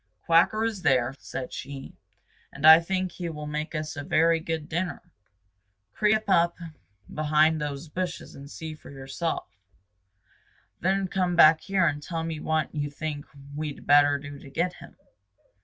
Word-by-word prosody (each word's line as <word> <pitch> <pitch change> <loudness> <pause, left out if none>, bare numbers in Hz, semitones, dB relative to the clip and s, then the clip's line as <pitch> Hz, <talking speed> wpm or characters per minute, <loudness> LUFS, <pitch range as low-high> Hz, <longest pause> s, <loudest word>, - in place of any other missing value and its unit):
"Quacker 170 +7 +4
is 220 -4 -3
there," 130 -5 +2
said 130 -1 -6
she, 135 0 -8 0.6
"and 140 +2 -4
I 160 +1 +11
think 185 +1 -2
he 175 0 -5
will 150 -2 -6
make 150 +2 -4
us 155 0 -4
a 145 - -5
very 165 +3 +3
good 160 -1 -4
dinner. 175 +2 -2 0.9
Creep 215 +1 +2
up 170 -3 +3 0.6
behind 155 +1 +2
those 145 +1 -4
bushes 180 +2 -5
and 140 +1 -11
see 160 +1 -7
for 155 - -14
yourself, 135 +5 -4 1.3
then 190 +2 +1
come 180 -1 0
back 160 -1 +7
here 195 -2 +1
and 150 -2 0
tell 165 +1 -4
me 165 -1 -4
what 155 0 -1
you 145 -1 -2
think 145 0 -5 0.3
we'd 150 -1 -5
better 145 0 +5
do 145 0 -9
to 140 - -12
get 175 +6 -1
him." - - -14
155 Hz, 155 wpm, -26 LUFS, 145-170 Hz, 1.3 s, I